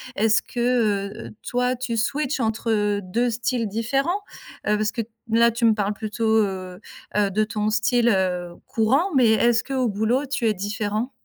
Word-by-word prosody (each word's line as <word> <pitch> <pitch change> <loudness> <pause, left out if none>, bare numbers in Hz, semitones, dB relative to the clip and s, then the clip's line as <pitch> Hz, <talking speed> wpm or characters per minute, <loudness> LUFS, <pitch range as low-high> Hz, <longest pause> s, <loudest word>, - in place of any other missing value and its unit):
Est-ce 220 +1 +3
que 225 -4 -1
heu, - - -11 0.2
toi 250 +1 0
tu 250 -1 -3
switch 280 +5 -1
entre 220 -3 0
2 235 +7 0
styles 235 0 -1
différents? 270 - -1 0.5
Heu, 210 0 +3
parce 215 0 0
que, 235 - -2 0.3
là, 235 +1 +5
tu 235 +1 -5
me 225 - +6
parles 205 -1 -1
plutôt 220 +1 0
heu, 185 -2 -5 0.4
heu, 205 -1 +3
de 210 +3 +1
ton 210 0 -1
style 230 +3 +2
heu, 180 -4 0
courant, 270 - +1
mais 250 -4 +5
est-ce 235 +2 +3
qu'au 260 -2 -1
boulot 225 +6 0
tu 260 -4 -1
es 215 - +1
différent? 210 +4 -2
225 Hz, 170 wpm, -23 LUFS, 210-245 Hz, 0.5 s, me